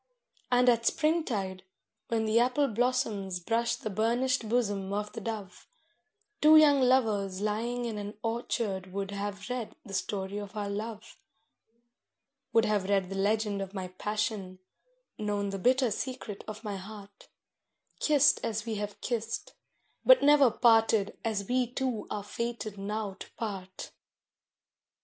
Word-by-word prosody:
And 250 0 +4
at 235 -1 +4
springtide, 230 - 0 0.4
when 225 -1 0
the 220 +1 +3
apple 255 +4 +3
blossoms 220 -6 0
brush 230 +6 0
the 215 - -5
burnished 235 +3 +1
bosom 205 -5 0
of 210 +1 -2
the - - -6
dove, 215 -5 -6 0.7
Two 310 +1 +8
young 290 -3 +6
lovers 215 -7 +2
lying 230 +4 -1
in 220 -3 -3
an 205 +1 -6
orchard 220 -5 -2
would 195 0 -3
have 200 0 -4
read 250 -3 -4
the 195 - -9
story 195 +1 -2
of 205 0 -8
our 205 -1 -2
love; 220 +2 -6 1.3
Would 225 -1 +4
have 205 -3 0
read 195 -2 +1
the - - -3
legend 205 0 +1
of 195 +1 -6
my 185 -1 -4
passion, 205 0 -3 0.6
known 205 -1 -1
the 195 - -4
bitter 255 +2 +3
secret 225 -3 -5
of 215 +1 -7
my 205 -2 -4
heart, 200 +1 -11 0.7
Kissed 290 -1 +4
as 220 -1 -2
we 225 -2 -3
have 205 -1 -5
kissed, 235 - -3 0.5
but - - +7
never 285 -2 +7
parted 225 -3 +3
as 210 -3 -2
we 250 0 +1
two 255 -4 -2
are 205 -1 -3
fated 230 -1 -4
now 205 0 -3
to - - -10
part. 195 -4 -6
215 Hz, 145 wpm, -30 LUFS, 200-240 Hz, 1.3 s, Two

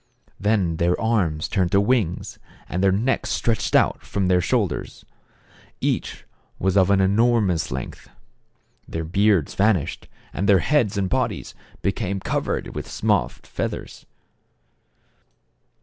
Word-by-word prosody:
Then 100 -6 +1
their 85 +2 +1
arms 95 -9 0
turned 90 -2 0
to 100 - +6
wings, 100 -5 0 0.3
and 90 - -2
their 95 - +5
necks 115 +8 0
stretched 115 -2 0
out - - +3
from 95 -2 -2
the 90 -1 +4
shoulders. 100 - -2 0.7
Each - - -2 0.3
was 95 +1 0
of 95 -1 +4
an 100 -1 +4
enormous 100 -3 +2
length. 65 0 -6 0.8
Their 80 - -4
beards 95 -1 +2
van 105 +2 +4
ished, 75 - -6 0.3
and 100 +2 -1
their 100 - +7
heads 110 - +1
and 100 -1 +1
bodies 90 - -2 0.3
became 100 -1 -1
cov - - -2
ered - - -3
with - - -6
soft - - 0
feathers. - - -5
95 Hz, 135 wpm, -23 LUFS, 90-105 Hz, 0.8 s, their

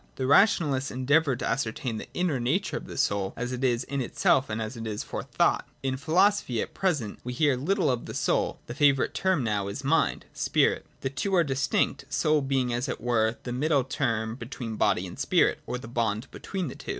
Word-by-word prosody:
The 130 - -2
rationalists 145 -3 +4
en 130 +1 -5
deavoured 145 -2 +3
to - - -1
ascertain 115 -2 -2
the - - -7
inner 175 -7 0
nature 155 +13 0
of - - -5
the - - -8
soul 100 -1 0
as 125 +1 -3
it 125 +1 -4
is 120 -1 +2
in 140 +1 -3
itself 130 +1 +2
and 110 +1 -2
as 110 +2 -4
it 115 -1 -6
is 105 -1 -3
for - - -5
thought. - - +1
— - - -37
In 130 -1 0
philosophy 160 - +2
at - - -3
pre 190 -1 +2
sent 110 -8 -6
we 125 - -4
hear 145 +1 +3
little 175 +5 +1
of 125 -2 -3
the - - -6
soul: - - 0
the 120 - -6
favourite 140 -1 +3
term 185 -7 +1
now 105 -3 -1
is 105 +8 -5
mind 160 +4 +1
(spirit). - - +1
The 135 - -2
two 190 +8 -1
are 175 - +5
distinct, 140 -1 0
soul 155 -2 +2
being 135 -3 0
as 120 +3 -2
it - - -3
were 115 -1 +1
the 120 - -4
middle 140 +1 +2
term 115 -4 -1
between 115 -2 -6
body 95 - +2
and 90 - -9
spirit, - - +2
or - - -2
the 125 - -9
bond 115 -1 -2
between 190 -4 -4
the 125 - -6
two. - - -11
130 Hz, 225 wpm, -27 LUFS, 115-145 Hz, -, are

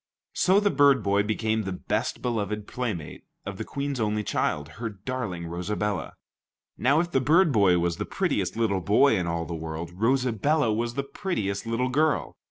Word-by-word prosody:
So 190 +2 +4
the 205 -1 +2
bird 140 -4 +4
boy 100 +1 +2
became 110 +1 0
the 95 -2 -4
best 90 - -2
beloved 105 -3 -2
playmate 105 -13 -5 0.2
of - - -6
the - - -2
Queen's 140 -1 -4
only 105 -1 0
child, 75 -7 -1
her 115 -1 -2
darling 105 -4 -5
Rosabella. 90 +2 -3 0.6
Now, 140 +5 +3
if 175 0 -4
the 135 - +2
bird 160 +5 +4
boy 100 -7 +4
was 85 0 0
the - - -3
prettiest - - -1
little 110 -4 +1
boy 110 +8 +4
in 90 -3 -1
all 85 0 -2
the 85 - -6
world, 80 +1 -5
Rosabella 125 - +1
was 120 +2 -2
the 140 - -1
prettiest 115 - -3
little 120 +3 0
girl. 150 +3 +1
110 Hz, 175 wpm, -26 LUFS, 95-135 Hz, 0.6 s, So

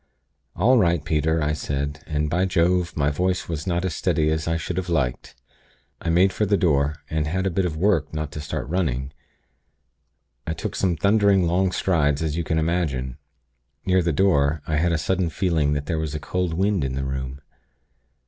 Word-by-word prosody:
"'All 120 +8 +4
right, 85 -6 +2
Peter,' 80 +1 +1
I 75 +1 +1
said, 70 +1 -3
and 75 -1 -1
by 90 +5 +1
Jove, 90 -1 +1
my 75 0 +2
voice 90 +4 -1
was 80 0 -4
not 90 0 0
as 90 - -1
steady 75 +1 +1
as 80 0 -1
I 80 0 +1
should 85 +2 -4
have 95 -1 -2
liked! 70 -8 -1 0.7
I - - -2
made 90 +3 +4
for 105 - 0
the 100 0 +3
door, 75 -5 +2
and 80 -1 -1
had 95 +4 -1
a 95 - +1
bit 95 +2 0
of 80 -3 -3
work 85 -4 +1
not 75 -1 -4
to 75 - -6
start 75 -2 -4
running. 70 -6 -1 1.3
I 80 - -1
took - - -5
some 90 -4 0
thundering 100 0 +3
long 90 +2 +1
strides, 75 -6 +1
as 80 -2 -1
you 85 - -1
can 80 +1 -1
imagine. 75 -6 -1 0.7
Near 95 0 +3
the 85 -1 0
door, 75 -3 +2
I 75 0 -1
had 85 +3 +2
a 85 - +2
sudden 90 +2 0
feeling 80 -5 +1
that 70 -1 -2
there 80 +1 -1
was 80 -1 -3
a - - -2
cold 90 +1 -2
wind 95 -2 +1
in 65 -1 -2
the 70 0 -2
room. 65 0 -4
80 Hz, 200 wpm, -23 LUFS, 75-90 Hz, 1.3 s, All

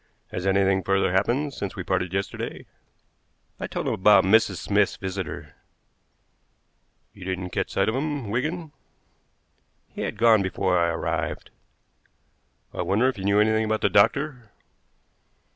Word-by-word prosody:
Has 90 +1 -3
anything 95 0 +3
further 95 -1 +1
happened 120 +10 0
since 100 -5 -5
we 95 - -5
parted 90 0 -1
yesterday?" 95 +1 -4 0.9
I - - -4
told - - -4
him - - +1
about 105 +2 +5
Mrs. 100 0 +4
Smith's 100 +2 +1
visitor. 95 -2 -6 1.6
"You 95 - -12
didn't 90 -1 -4
catch - - -2
sight - - 0
of 110 - +1
him, 140 -5 -3
Wigan?" 155 +7 -2 1.2
"He - - -8
had - - -3
gone 115 -1 +5
before 95 -1 0
I 85 -1 +2
arrived." 85 - -3 1.2
"I - - -3
wonder 110 +7 +2
if 130 - -5
he 95 - -6
knew 100 +1 +3
anything 110 +1 +3
about 110 0 -1
the - - +3
doctor." 125 +2 +2
100 Hz, 145 wpm, -25 LUFS, 95-115 Hz, 1.6 s, about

